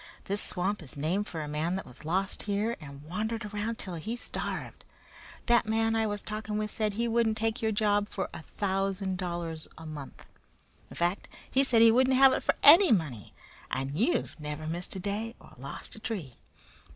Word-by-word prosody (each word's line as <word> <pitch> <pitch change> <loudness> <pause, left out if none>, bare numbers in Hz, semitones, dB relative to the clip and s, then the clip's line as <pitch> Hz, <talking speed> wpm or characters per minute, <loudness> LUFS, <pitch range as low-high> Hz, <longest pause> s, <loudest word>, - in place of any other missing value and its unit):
This 200 +1 0
swamp 195 +3 -1
is 145 -3 -8
named 180 +8 0
for 160 -2 -4
a - - -5
man 155 +4 -1
that 190 - -4
was 125 - -13
lost 185 +5 -1
here 210 +4 0
and 140 -1 -10
wandered 215 +7 -3
around 210 +2 -3
'til 185 - -6
he 220 +9 -4
starved. 245 - -4 0.6
That 240 -2 +4
man 225 +1 +2
I 220 -1 +2
was 205 -1 -3
talking 215 0 -4
with 210 0 -2
said 215 -2 0
he 235 +3 0
wouldn't 225 -1 +2
take 225 +2 -1
your 220 -1 +1
job 205 -1 +2
for 190 - -3
a - - -7
thousand 195 0 -2
dollars 170 -3 -4
a 160 - -10
month 150 -3 -8 0.6
in - - -11
fact, 175 +3 0 0.2
he 270 - +4
said 235 -4 +5
he 230 - +8
wouldn't 260 +2 +4
have 270 0 +8
it - - 0
for - - +1
any 335 +3 +9
money, 150 - 0 0.3
and 135 +1 -2
you've 220 - 0
never 150 +1 -5
missed 170 +4 -1
a - - -3
day 210 +5 -3
or - - -16
lost - - -7
a - - -10
tree. 180 - -5
205 Hz, 200 wpm, -29 LUFS, 165-225 Hz, 0.6 s, any